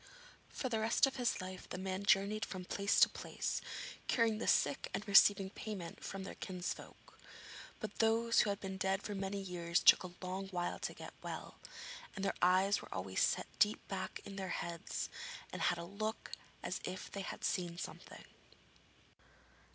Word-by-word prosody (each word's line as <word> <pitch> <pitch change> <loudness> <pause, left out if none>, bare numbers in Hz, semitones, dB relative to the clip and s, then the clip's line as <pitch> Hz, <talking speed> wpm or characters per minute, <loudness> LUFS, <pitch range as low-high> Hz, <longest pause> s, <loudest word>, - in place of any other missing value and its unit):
For 260 - -3
the 225 -3 0
rest 220 +4 +4
of 270 - -3
his 245 -6 +1
life 185 0 -7
the - - -4
man 190 +1 -3
journeyed 200 +2 +3
from 185 -2 -4
place 200 +2 +2
to - - +10
place, - - -3 0.5
curing 225 -3 +3
the - - -2
sick 145 - +3
and 210 - -4
receiving 195 -1 +7
payment 195 -6 -6
from 195 0 -4
their - - -6
kinsfolk. 180 -2 -6 0.6
But 210 -1 -6
those 230 +1 +4
who 210 - +4
had 200 0 -1
been 190 -1 -5
dead 190 +1 0
for 210 - -3
many 195 0 -2
years 175 -2 0
took - - +8
a 185 - -5
long 190 +1 -3
while 175 -2 -2
to - - -3
get - - -8
well, - - -6 0.6
and 195 -1 -2
their 195 - +1
eyes 185 +3 +4
were - - -12
always 95 0 -2
set - - +3
deep 210 +1 +3
back 190 -1 -3
in 195 - -7
their 190 -1 -3
heads, 170 -1 -3 0.5
and - - -4
had 175 - +3
a 170 - -5
look 215 +5 -4 0.3
as - - -2
if 185 - -5
they 200 - -4
had 190 - -6
seen 175 -2 0
something. - - -7
195 Hz, 180 wpm, -36 LUFS, 180-205 Hz, 0.6 s, to